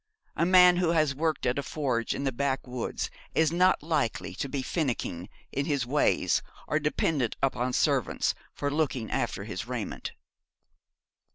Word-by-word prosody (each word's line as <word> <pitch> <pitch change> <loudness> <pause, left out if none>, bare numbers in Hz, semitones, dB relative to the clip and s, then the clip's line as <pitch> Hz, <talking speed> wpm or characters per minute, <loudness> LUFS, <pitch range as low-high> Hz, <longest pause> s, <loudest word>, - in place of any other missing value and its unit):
A 170 - +2
man 180 -1 +7
who 175 -2 +2
has 155 -4 +3
worked 155 +3 -1
at 125 +3 +1
a - - 0
forge 130 -6 -1
in - - -3
the 135 - +1
backwoods 130 -2 -2 0.2
is 160 -1 +3
not 180 -1 +3
likely 115 - -1
to 135 - -4
be 135 -1 -2
finicking 120 - -2 0.2
in 140 +1 -2
his 140 -6 0
ways, 145 +4 +2 0.3
or 155 - +1
dependent 150 -4 0
upon 130 -2 0
servants - - +1 0.2
for 145 0 -3
looking 140 -7 -1
after - - -1
his - - -5
raiment. - - -4
140 Hz, 155 wpm, -28 LUFS, 125-160 Hz, 0.3 s, man